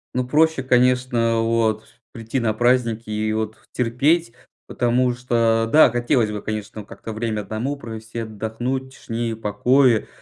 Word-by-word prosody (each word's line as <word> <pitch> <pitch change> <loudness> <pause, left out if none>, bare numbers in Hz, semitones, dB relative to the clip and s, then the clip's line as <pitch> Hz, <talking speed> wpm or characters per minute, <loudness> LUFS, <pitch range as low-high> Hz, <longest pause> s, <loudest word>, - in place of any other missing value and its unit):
Ну, 125 0 0
проще, 155 0 +2
конечно, 125 -2 +2
а, - - +2
вот, 115 -1 0 0.3
прийти 115 +3 -3
на 115 -3 0
праздники 115 -1 +1
и, 110 0 -1
вот, 110 0 -3
терпеть, 125 +4 +1 0.3
потому 125 +1 +1
что, 115 -2 +1
да, 155 -5 +7
хотелось 120 -2 +1
бы, 105 - -5
конечно, 110 0 -5
как-то 110 +2 -9
время 110 -1 -2
1 110 +7 -3
провести, 115 -3 -8
отдохнуть 110 +4 -3
в - - -15
тишине 115 0 -3
и - - -3
покое. 115 +3 +2
115 Hz, 155 wpm, -21 LUFS, 110-125 Hz, 0.3 s, да